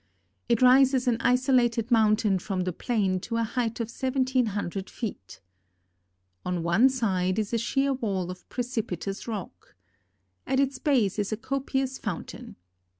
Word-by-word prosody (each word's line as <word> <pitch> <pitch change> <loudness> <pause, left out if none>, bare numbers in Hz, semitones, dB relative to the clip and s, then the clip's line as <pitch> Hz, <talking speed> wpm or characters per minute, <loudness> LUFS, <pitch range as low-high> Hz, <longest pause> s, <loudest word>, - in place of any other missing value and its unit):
It 235 +1 +3
rises 260 0 +5
an 235 -2 +3
isolated 250 -2 +2
mountain 215 -3 +3
from 190 0 -3
the 180 0 -2
plain 195 -3 0
to 230 +5 -4
a 230 - +1
height 230 0 -2
of 230 - -2
seventeen 260 -1 0
hundred 195 -2 -4
feet. 205 - -7 1.0
On 180 -2 -2
one 180 +10 +4
side 190 -8 0
is 215 0 -2
a 230 - +2
sheer 270 +4 +1
wall 195 -8 -2
of 180 - -12
precipitous 220 -6 -4
rock. 195 - -7 0.7
At 265 - +1
its 275 -1 0
base 235 - +1
is 205 0 -1
a 215 - -1
copious 265 +1 -2
fountain. 205 -9 -6
230 Hz, 150 wpm, -27 LUFS, 195-255 Hz, 1.0 s, rises